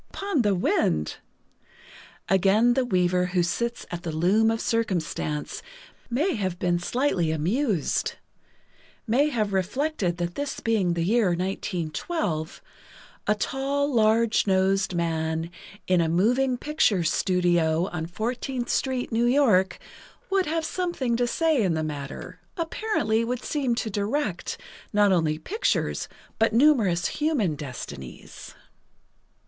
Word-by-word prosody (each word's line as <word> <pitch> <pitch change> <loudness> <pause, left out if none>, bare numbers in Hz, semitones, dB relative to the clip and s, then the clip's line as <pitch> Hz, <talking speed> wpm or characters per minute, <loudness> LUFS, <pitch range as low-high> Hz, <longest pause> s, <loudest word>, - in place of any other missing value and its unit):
"Upon 395 -8 -1
the 205 -3 +2
wind!" 80 - 0 1.1
Again 200 +5 +4
the 260 +1 +1
Weaver 180 -3 +2
who 175 - +4
sits 235 +7 -2
at 175 -1 -4
the 170 -2 -4
Loom 190 +8 +3
of 225 0 0
Circumstance 175 -10 -2 0.5
may 295 +11 +1
have 190 -5 -2
been 175 -1 +1
slightly 185 - 0
amused—may 220 - -2
have 215 -7 -1
reflected 195 - -1
that 175 0 -2
this 285 +5 -4
being 200 -7 +1
the 170 - 0
year 220 +3 +3
1912, 175 - -3 0.6
a 210 - +3
tall, 275 +5 -1
large 225 -1 +3
nosed 190 0 +2
man, 160 0 -1 0.3
in 185 -2 +3
a 165 - +1
moving 245 +9 +2
picture 240 - +1
studio 175 -1 +2
on 160 -2 -4
Fourteenth 240 +6 -3
Street, 260 -2 -1
New 230 +1 +2
York, 235 -8 +3 0.5
would 385 -3 +2
have 320 +1 -1
something 330 -9 -1
to 245 +1 +1
say 315 0 +2
in 180 -5 +1
the 160 - -1
matter—apparently—would 230 - -3
seem 270 -6 0
to 230 -2 -3
direct, 205 - -2 0.3
not 205 -1 +4
only 160 -4 +2
pictures, 435 - -1 0.3
but 225 0 +3
numerous 225 - +4
human 290 - 0
destinies. 115 - -9
205 Hz, 120 wpm, -25 LUFS, 175-250 Hz, 1.1 s, Again